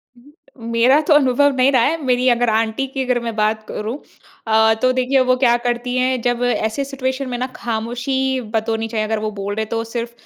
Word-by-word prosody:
हुँ, 240 - -21 0.3
हुँ। 230 -2 -9
मेरा 245 +5 +4
तो 315 - +5
अनुभव 285 0 +4
नहीं 260 +2 +3
रहा 255 - +3
है। 325 +5 +1
मेरी 250 -1 +1
अगर 240 -1 +2
आंटी 225 +4 0
की 265 0 -3
अगर 250 -1 +1
मैं 230 -2 -4
बात 215 0 0
करूँ 220 +6 -4 0.5
अ, 220 0 +4
तो 255 - +3
देखिए 255 +1 +1
वो 255 - +5
क्या 245 -2 +3
करती 245 +1 -2
हैं, 255 -1 +1
जब 245 0 0
ऐसे 245 +2 0
सिचुएशन 265 -1 -3
में 245 - -3
ना 255 +1 -2
ख़ामोशी 245 +3 -2
बरतनी 225 0 -1
चाहिए। 220 -1 -2
अगर 220 0 -1
वो 215 0 -3
बोल 200 +1 -3
रहे 220 - -1
हैं 215 - -9
तो 230 0 -2
सिर्फ़ 235 +1 -5
245 Hz, 220 wpm, -19 LUFS, 225-260 Hz, 0.5 s, तो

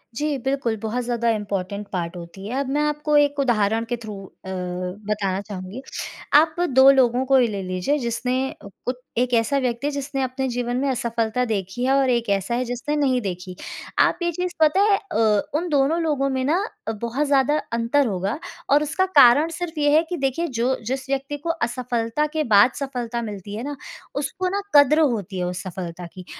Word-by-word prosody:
जी, 295 +2 -1
बिल्कुल, 270 -4 0
बहुत 225 +4 -3
ज़्यादा 235 -1 0
इम्पोर्टेंट 200 -1 -3
पार्ट 175 -2 -3
होती 175 +3 -9
है। 255 +5 -2
अब 280 -1 -2
मैं - - +2
आपको 300 0 0
एक 290 -1 +3
उदाहरण 225 -4 +2
के 240 - 0
थ्रू 220 -3 -8 0.3
अ, - - -6
बताना 190 +2 -3
चाहूँगी। 200 +3 -7 0.5
आप 315 +1 +6
2 265 +1 +7
लोगों 255 -2 +3
को 270 0 +4
ही 250 -2 +4
ले 200 -3 -4
लीजिए, 185 +10 -1
जिसने 250 +1 -1 0.2
अ, - - -13 0.2
उ 250 - +1 0.2
एक 250 +1 +1
ऐसा 230 +4 +2
व्यक्ति 250 +1 -1
है - - 0
जिसने 280 -1 -3
अपने 260 +1 -2
जीवन 245 0 -2
में 275 - 0
असफलता 235 -1 -1
देखी 205 0 -3
है 265 - +3
और 275 -1 +3
एक 235 -3 +1
ऐसा 200 +3 0
है 250 +1 -1
जिसने 245 +5 -3
नहीं 270 -4 +2
देखी। 180 -2 -5 0.4
आप - - +4
ये 345 - +1
चीज़ 360 +2 -3
पता 315 +5 +4
है, 405 -1 +4
अ, 215 -6 +3 0.2
उन 345 +3 -2
दोनों 290 +3 +2
लोगों 290 -4 0
में 260 -1 -1
ना 330 +7 +2 0.3
अ, - - +1
बहुत 235 +6 -2
ज़्यादा 280 +1 +3 0.2
अंतर 235 +4 +2
होगा 195 - -2 0.3
और 290 +2 +5
उसका 315 +5 0
कारण 280 +6 +7
सिर्फ़ 340 -3 -4
ये 290 0 +3
है 320 - +5
कि 355 - -2
देखिए 275 +4 -1
जो 255 +3 +2
जिस 260 +1 -3
व्यक्ति 275 +1 -2
को 300 +4 -5
असफलता 245 -2 -1
के 310 - +2
बाद 205 +5 +7
सफलता 245 -4 -3
मिलती 205 -2 -6
है 225 - -5
ना, 290 +1 -4 0.4
उसको 365 +6 -2
ना 400 +2 -1
कदर 290 +2 +7
होती 215 - 0
है - - -1
उस 180 0 -3
सफलता 180 -1 -6
की। 185 -1 -10
245 Hz, 200 wpm, -23 LUFS, 210-285 Hz, 0.5 s, 2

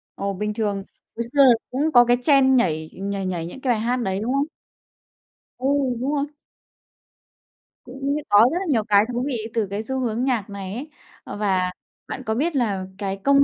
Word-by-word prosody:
Ồ, 200 0 -2
bình 210 +2 -2
thường. 205 -3 -1 0.3
Hồi 235 - -2
xưa 285 - +5
là 255 -3 +8 0.2
cũng 290 +5 0
có 245 0 +8
cái 245 +1 +3
trend 270 -2 +5
nhảy 160 -8 0
nhảy 195 0 -3
nhảy 175 -3 -2
những 220 +10 -9
cái 260 - +1
bài 215 - -2
hát 240 +3 0
đấy, 195 -6 -1
đúng 230 +5 -1
không? 280 +1 +2 1.1
Ừ, 255 - -5 0.3
đúng 265 +4 -1
rồi. 280 - 0 1.6
Cũng 275 +3 -3
có 205 - +6
rất 340 - -1
là 385 - -3
nhiều 230 -7 +2
cái 210 -1 +4
thú 245 +1 -1
vị 230 -6 -3
từ 220 -4 0
cái 200 +3 -4
xu 265 +3 -3
hướng 240 -1 -1
nhạc 240 -7 0
này 195 -1 -6
ấy. 270 +7 -6 0.3
Ờ, - - -7
và 185 -3 +1 0.4
bạn 260 - -6
có 220 -1 -1
biết 310 +6 0
là 205 -7 0
cái 195 -1 -3
công 280 0 +5
230 Hz, 205 wpm, -23 LUFS, 200-265 Hz, 1.6 s, là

